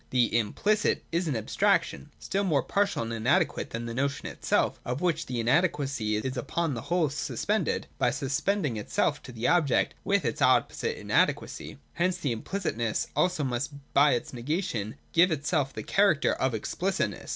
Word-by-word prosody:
The 120 -3 +2
'implicit' 205 - +1
is 170 +1 0
an 145 - 0
abstraction, 85 -9 0
still 195 +1 -2
more 155 -8 +2
partial 200 -9 0
and 115 0 -4
inadequate 115 +5 +1
than 115 +1 -5
the 115 - -4
notion 140 +3 -1
itself, - - 0
of 125 +2 -3
which 165 -2 0
the 125 -2 -3
inadequacy 135 -4 +1
is 130 +5 -2
upon 160 +5 -1
the 115 - -4
whole 170 -2 0
suspended, 145 - -1
by - - +3
suspend 145 +7 -1
ing 120 -6 -2
itself 105 - 0
to - - -10
the 115 0 -2
object 160 -7 +2
with 200 -4 +1
its 115 - -2
opposite - - +2
inadequacy. - - 0 0.2
Hence 180 +2 0
that 140 - -2
implicitness 115 - -2
also 180 -4 +1
must, 130 +3 -2 0.2
by 145 0 +5
its 120 - -3
negation, 120 - -2 0.2
give 175 +2 +6
itself 145 -2 0
the - - -6
character 195 -7 +3
of 130 -3 0
explicitness. 185 - -2
140 Hz, 165 wpm, -28 LUFS, 120-175 Hz, 0.2 s, give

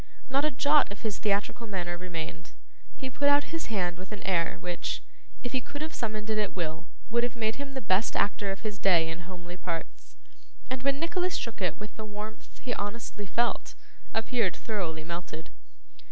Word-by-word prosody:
Not 275 +2 +5
a - - +5
jot 290 -1 +5
of 200 - -6
his 215 -3 -1
theatrical 210 +3 +1
manner 175 -4 -1
remained; 165 - -5 0.4
he 265 - -3
put 285 +3 +4
out 285 +2 +4
his 330 - -1
hand 180 -5 0
with 190 +2 -8
an 210 - -5
air 170 -4 +2
which, 175 -1 -2 0.4
if 245 - -2
he 260 - +2
could 285 +5 -5
have 315 - -4
summoned 215 -2 -2
it 215 - +2
at 210 -2 0
will, 165 -1 -2 0.2
would 235 +1 +5
have 240 0 0
made 220 -1 +1
him 275 -1 -5
the 265 - -1
best 195 +4 +3
actor 205 0 +2
of 195 - -4
his 210 -2 -3
day 170 -4 +6
in 175 +2 -5
homely 175 -1 -7
parts, 170 -2 -4 0.6
and 260 -1 0
when 275 +1 +3
Nicholas 355 +2 +1
shook 230 -3 -3
it 180 -4 +1
with 210 0 -7
the 220 - -4
warmth 215 +1 -7
he 245 - 0
honestly 205 -1 -3
felt, 235 +5 +1 0.4
appeared 225 -4 +2
thoroughly 170 -8 -2
melted. 170 -1 -5
210 Hz, 195 wpm, -30 LUFS, 180-240 Hz, 0.6 s, day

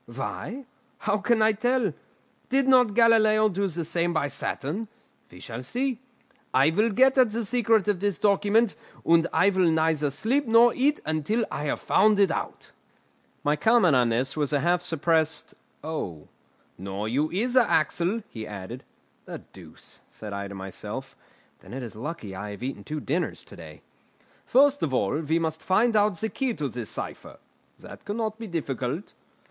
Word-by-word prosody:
Why? 185 - -6 0.4
How 205 - 0
can 220 +1 +2
I 220 - +5
tell? 235 - 0 0.6
Did 270 0 +2
not 250 -5 +4
Galileo 215 -2 +5
do 200 +1 -1
the 170 -2 -4
same 170 +1 0
by 145 -3 0
Saturn? 150 +9 -3 0.4
We 90 - -14
shall 115 +5 -7
see. 245 - -2 0.6
I 135 +4 +5
will 210 +7 +2
get 260 +5 +4
at 250 -3 +5
the 225 +1 -3
secret 225 -2 +2
of 205 -4 +1
this 200 -1 -1
document, 205 +2 +2 0.3
and 165 0 +4
I 180 +5 +3
will 185 -3 +3
neither 160 -2 +1
sleep 235 - -1
nor 230 +1 +6
eat 285 +3 +1
until 155 +9 0
I 150 - -4
have 145 - -2
found 210 +1 +3
it 195 -4 +4
out." - - -5 0.7
My 145 0 +2
comment 200 - +4
on 125 -2 +3
this 125 +4 -1
was 150 -2 -1
a 145 -2 +1
half 175 +2 +2
suppressed 160 -1 0 0.3
"Oh!" 90 - -5 0.5
"Nor 100 +2 -4
you 140 +7 0
either, 245 +7 +2
Axel," 185 - +1
he 110 -2 -8
added. 105 +5 -8 0.4
"The - - -8
deuce!" - - -14
said 105 -2 -8
I 100 0 -4
to 100 - -9
myself; 95 -1 -7 0.4
"then - - -13
it 135 - -5
is 115 - -8
lucky 115 - -6
I 105 +2 -6
have 105 +3 -8
eaten 130 -6 -5
two 155 +5 -5
dinners 165 +7 -2
to - - -14
day!" - - -12 0.6
"First 285 +2 +4
of 135 -4 0
all 125 +6 0
we 160 +1 0
must 160 -1 -2
find 220 +5 +2
out 210 -3 +3
the 220 - -2
key 260 -2 -2
to 145 -2 -3
this 120 -3 -5
cipher; - - -6 0.4
that - - -12
cannot 215 +1 -3
be 225 - -6
difficult." 150 - -4
175 Hz, 175 wpm, -26 LUFS, 140-220 Hz, 0.7 s, nor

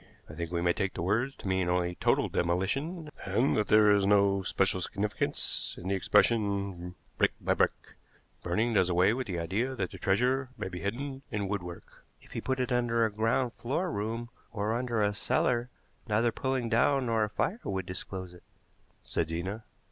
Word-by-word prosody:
I - - -10
think 85 +1 -5
we 85 -1 -1
may 85 0 +3
take 95 -1 -2
the - - -3
words 115 +9 0
to - - -8
mean 95 -2 +1
only 90 0 +1
total - - +2
demolition, 135 - -1
and 130 +4 +1
that 105 - +1
there 105 -1 +6
is 100 -1 +4
no 100 -1 +4
special 95 0 +1
significance 100 +4 0
in 90 - -5
the - - +1
expression 100 -3 +1 0.2
'brick - - +3
by - - +1
brick.' - - 0 0.5
Burning 110 +7 0
does 95 -4 +3
away 90 +4 +4
with 130 0 -3
the 90 -4 -3
idea 105 +10 -1
that 95 -6 -3
the - - -9
treasure 125 +7 +1
may - - -4
be 90 -1 -6
hidden 130 +8 -4
in 105 -3 -2
woodwork." 90 -4 -6 0.2
"If - - -20
he - - -4
put 130 0 -1
it 125 -1 -1
under 120 -2 +2
a 110 - -1
ground 115 +3 +1
floor 165 +9 -2
room 115 +2 -3 0.2
or 105 0 -1
under 120 -3 0
a 105 0 +1
cellar 120 +3 +1 0.4
neither 115 +2 +2
pulling 130 0 -1
down 130 +4 +3
nor 115 -2 +2
a 105 - -1
fire 190 - -1
would 95 -1 -2
disclose 95 0 -5
it," 90 - -15 0.6
said 80 - -2
Zena. 95 +7 -4
105 Hz, 190 wpm, -30 LUFS, 95-120 Hz, 0.6 s, there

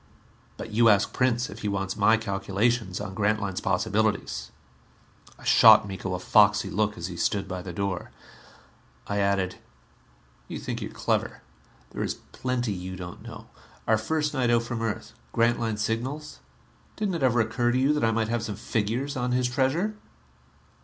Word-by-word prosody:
But 110 - -7
you 115 +1 +5
ask 105 -1 +3
Prince 125 -1 +1
if 105 - -10
he 105 - -3
wants 95 -1 -2
my 110 +2 +4
calculations 100 0 -1
on 95 - -5
Grantline's 105 -2 0
possibilities." 110 0 0 0.9
I - - -16
shot - - +7
Miko 95 -1 -4
a - - -4
foxy 105 +2 +4
look 105 +2 0
as 85 - -5
he 90 -1 -5
stood 95 +2 0
by 95 -1 -4
the 90 0 -7
door. 95 0 -3 1.0
I 100 0 -2
added, 100 -2 0 0.9
"You - - -5
think - - -5
you - - -4
are - - -14
clever. - - -1 0.5
There - - -5
is - - -1 0.2
plenty 125 -4 -2
you 95 0 -6
don't 90 0 -8
know. 115 0 -10 0.4
Our 110 -1 +4
first 150 +6 -1
night 130 -4 +1
out 120 -1 +3
from 115 -1 -4
Earth 110 -2 -3 0.2
Grantline's 115 -2 +1
signals 135 +7 -3 0.6
didn't 210 -3 -1
it 165 - -3
ever 125 -2 +3
occur 115 +2 +1
to 125 - +1
you 135 +3 +3
that 150 - -1
I 115 - +4
might 110 0 0
have 120 -1 0
some 110 -2 -4
figures 115 +7 -2
on 125 -1 -1
his 125 0 +2
treasure?" 135 - 0
110 Hz, 175 wpm, -26 LUFS, 100-120 Hz, 1.0 s, shot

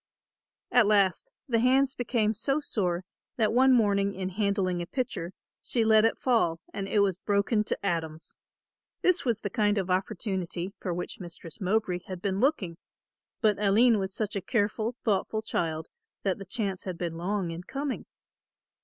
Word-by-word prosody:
At 245 -4 +5
last 200 -4 +2 0.2
the 235 -3 +2
hands 265 +3 +3
became 230 -3 0
so 275 +7 0
sore 185 - -1 0.3
that 220 -3 +2
one 260 +2 +5
morning 200 -4 +3
in 185 0 -3
handling 195 -2 0
a 170 - -5
pitcher, 225 -9 -3 0.3
she 230 -3 0
let 220 0 +6
it 225 - +2
fall 225 -10 +2
and 195 -1 -3
it 205 0 +3
was 195 -3 +2
broken 205 +1 +1
to 200 - -3
atoms. 160 -3 -2 0.7
This 365 -3 +3
was 230 -3 0
the 205 - -3
kind 210 0 +2
of 190 -2 -1
opportunity 190 -1 -2
for 185 - -3
which 175 +1 -4
Mistress 170 +1 -10
Mowbray 190 -1 +1
had 185 -2 -5
been 195 +1 -1
looking, 210 - +1 0.6
but 210 -3 +2
Aline 215 +3 +5
was 190 -1 -2
such 210 +1 -2
a 200 - -1
careful, 220 +2 0
thoughtful 215 +1 0
child 160 -6 -2 0.4
that 195 -1 0
the 195 - -7
chance 195 -1 -3
had 185 -3 -4
been 170 -1 -3
long 180 +1 -2
in 165 +1 -5
coming. 275 +7 -4
200 Hz, 170 wpm, -28 LUFS, 185-225 Hz, 0.7 s, let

